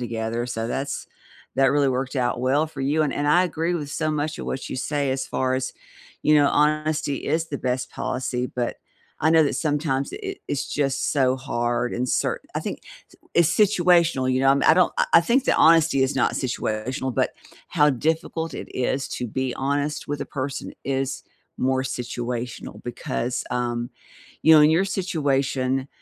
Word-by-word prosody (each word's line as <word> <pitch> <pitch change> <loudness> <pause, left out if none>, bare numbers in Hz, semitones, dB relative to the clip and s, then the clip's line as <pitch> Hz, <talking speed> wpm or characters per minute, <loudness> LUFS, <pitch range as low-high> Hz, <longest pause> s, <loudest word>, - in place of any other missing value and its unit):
together, 115 0 -2
so 115 -2 -3
that's 135 +4 -3 0.5
that 135 +1 +4
really 145 -1 +3
worked 130 +1 -2
out 120 -1 0
well 135 +5 +2
for 155 -3 -9
you, 145 +4 +1
and 150 - -1
and 145 0 -1
I 175 +5 +5
agree 170 0 -1
with 150 -4 -4
so 155 +1 -1
much 150 +1 -2
of - - -6
what 135 - -4
you - - -5
say 140 +1 -1
as 135 0 -2
far 130 0 0
as, 130 0 -2 0.5
you 155 - +4
know, 145 -1 +5
honesty 150 -1 +1
is 160 +3 0
the 140 - -4
best 125 0 -2
policy. 125 -1 -2
But, 120 -1 -3 0.4
I 160 - +3
know 160 0 +6
that 145 - -1
sometimes 145 -3 -1
it - - -7
it 390 -1 -5
it's 140 - -2
just 135 -2 0
so 130 -3 +2
hard 120 -2 -1
and 125 +1 -1
cert - - 0 0.2
I - - -1
think - - -5 0.5
it's 170 -2 +5
situational, 175 -9 +3
you 130 0 +1
know, 135 - +4
I'm 140 0 +3
I - - +7
don't 180 -2 +3
I - - +3
I - - +9
think 250 +7 +2
that - - +2
honesty 160 -4 +5
is 130 +2 0
not 130 - +2
situational, 125 +1 -2
but - - +1 0.4
how 150 -4 +4
difficult 160 +4 -1
it - - -6
is 130 +2 -1
to 125 - -3
be 130 +2 -2
honest 145 +2 -2
with 145 0 -3
a - - -3
person 135 -1 -4
is 135 -1 -2 0.4
more 130 0 +1
situational, 125 -1 -5
because, 120 0 -3
um, 120 -1 -1 0.5
you 160 - +7
know, 155 - +8
in 150 - +7
your 170 +4 +3
situation, 135 -8 0
135 Hz, 190 wpm, -24 LUFS, 130-155 Hz, 0.5 s, I